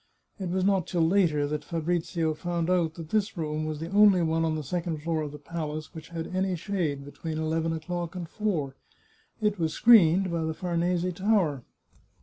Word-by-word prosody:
It 190 -2 -3
was 185 +1 0
not 195 -3 +2
till 170 -3 +2
later 165 -6 +3
that 150 +1 -3
Fabrizio 165 -1 -1
found 170 +1 -2
out 165 -3 +1
that 165 -2 -8
this 210 0 0
room 155 -1 -2
was 155 -1 -4
the 165 +3 -5
only 200 -3 +6
one 165 0 +1
on 160 -1 +1
the 155 - -3
second 165 0 -3
floor 165 -1 0
of 150 -2 -4
the 150 - -8
palace 155 0 -5
which 160 -1 -10
had 170 +1 -5
any 190 0 +1
shade 160 -6 -2
between 155 +2 -6
eleven 160 +1 0
o'clock 170 +2 -4
and 175 -2 -5
four; 165 -9 -2 0.7
it 210 -2 +1
was 160 -2 0
screened 195 -5 +6
by 170 -1 -1
the 160 0 -2
Farnese 175 0 0
Tower. 180 - +1
165 Hz, 190 wpm, -27 LUFS, 155-180 Hz, 0.7 s, only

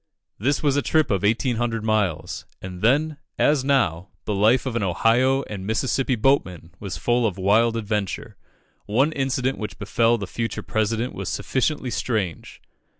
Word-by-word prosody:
This 140 +9 0
was 140 -2 +2
a 145 - +2
trip 155 -3 +1
of 95 -3 +1
1800 115 +1 0
miles, 95 -7 -1
and 90 -1 -8
then, 145 +6 +2 0.2
as 145 -3 +3
now, 100 - +1 0.2
the 105 - -1
life 110 +7 +3
of 130 -3 -3
an 115 - 0
Ohio 115 +8 +2
and 100 -6 -7
Mississippi 130 +3 0
boatman 95 - 0
was 100 -3 -5
full 120 0 +1
of 100 - -4
wild 110 +4 +3
adventure. 105 -3 -3 0.5
One 130 +9 +2
incident 135 -2 -1
which 105 - -5
befel 115 +3 +2
the 100 - -4
future 115 +5 -4
President 110 +3 -1
was - - -5
sufficiently 130 -1 -1
strange. 105 -8 -3
115 Hz, 155 wpm, -23 LUFS, 100-130 Hz, 0.5 s, as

